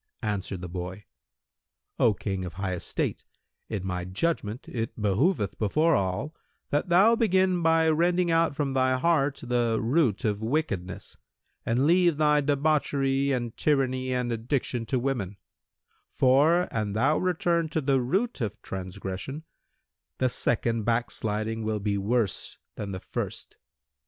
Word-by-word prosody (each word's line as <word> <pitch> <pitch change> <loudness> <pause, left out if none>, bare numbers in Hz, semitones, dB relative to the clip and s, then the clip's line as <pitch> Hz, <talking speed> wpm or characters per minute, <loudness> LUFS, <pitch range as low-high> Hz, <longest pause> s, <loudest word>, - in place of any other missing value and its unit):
Answered 100 -3 -3
the 90 - -5
boy, 90 +3 -6 0.9
"O 110 -3 +4
King 95 -2 -3
of 90 -2 -7
high 95 0 -2
estate, 90 - -3 0.5
in 100 -4 -3
my 90 -1 -2
judgment 105 - -2
it 115 -1 -4
behoveth 105 - +1
before 155 +10 +2
all, 100 - -1 0.4
that 150 +6 0
thou 195 +7 +6
begin 190 -5 +2
by 165 0 +3
rending 170 +2 +2
out 165 -2 +2
from 140 -2 -1
thy 130 -1 +2
heart 145 -2 +1
the 120 -2 +1
root 125 - +1
of 105 -1 0
wickedness 110 - -3 0.5
and 120 +4 +2
leave 175 -1 +4
thy 150 -1 +4
debauchery 140 -1 +1
and 120 -3 -2
tyranny 130 -3 +1
and 125 -1 -1
addiction 120 0 -2
to 130 - 0
women; 120 -7 -2 0.7
for, 150 +7 +4
an 105 -2 -2
thou 135 +8 +2
return 170 -2 +1
to 160 - -1
the 135 -2 +2
root 190 - -1
of 110 -1 -3
transgression, 95 - -6 0.7
the 130 - +2
second 115 -1 0
backsliding 110 -1 -1
will 110 -1 -1
be 100 -1 -1
worse 105 -1 -1 0.2
than 100 -2 -5
the 95 - -4
first." - - -5
125 Hz, 140 wpm, -27 LUFS, 105-155 Hz, 0.9 s, thou